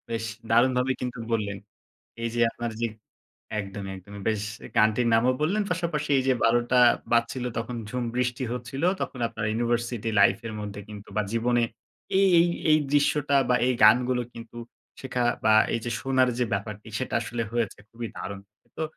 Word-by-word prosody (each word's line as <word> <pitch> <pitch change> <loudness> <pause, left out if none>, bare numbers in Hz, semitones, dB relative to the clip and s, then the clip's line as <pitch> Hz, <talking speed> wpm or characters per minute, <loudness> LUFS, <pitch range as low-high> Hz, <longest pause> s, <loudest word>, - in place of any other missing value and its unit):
বেশ 115 -1 -2 0.3
দারুণভাবে 125 +2 +3
কিন্তু 125 0 -4
বললেন। 105 -3 -1 0.7
এই 115 - 0
যে 120 - +1
আপনার 120 0 -4
যে 120 - +2 0.7
একদমই, 100 -1 -5
একদমই। 100 +2 -11
বেশ, 110 -2 0 0.3
গানটির 110 +3 +3
নামও 120 +3 +4
বললেন, 195 +8 +1
পাশাপাশি 170 -4 -1
এই - - +1
যে 130 - +4
১২ঃ০০ 120 +2 +3 0.3
বাজছিল, 120 +2 +1
তখন 120 +1 -4
ঝুম 125 +2 -3
বৃষ্টি 125 0 -1
হচ্ছিল। 125 +3 -5 0.2
তখন 130 - -4
আপনার 110 -1 -5
ইউনিভার্সিটি 120 0 -1
লাইফের 110 +3 +3
মধ্যে 100 -1 -6
কিন্তু 105 -1 -10
বা 105 - +3
জীবনে 120 +1 +2 0.6
এই 195 - +5
এই 170 - +5 0.2
এই 155 - +6
দৃশ্যটা, 145 -1 +3
বা 125 - +4
এই 130 - +3
গানগুলো 125 +3 +5
কিন্ত 115 -1 -11 0.5
শেখা 125 -2 -1 0.2
বা 110 - +5 0.2
এই - - +1
যে 120 - -3
শোনার 130 -1 +2
যে 125 - +2
ব্যাপারটি, 105 +1 -4
সেটা 130 - -3
আসলে 115 0 -3
হয়েছে। 115 -4 -1
খুবই 115 0 -6
দারুণ। 95 +2 -6 0.4
তো - - -3
120 Hz, 165 wpm, -26 LUFS, 110-125 Hz, 0.7 s, এই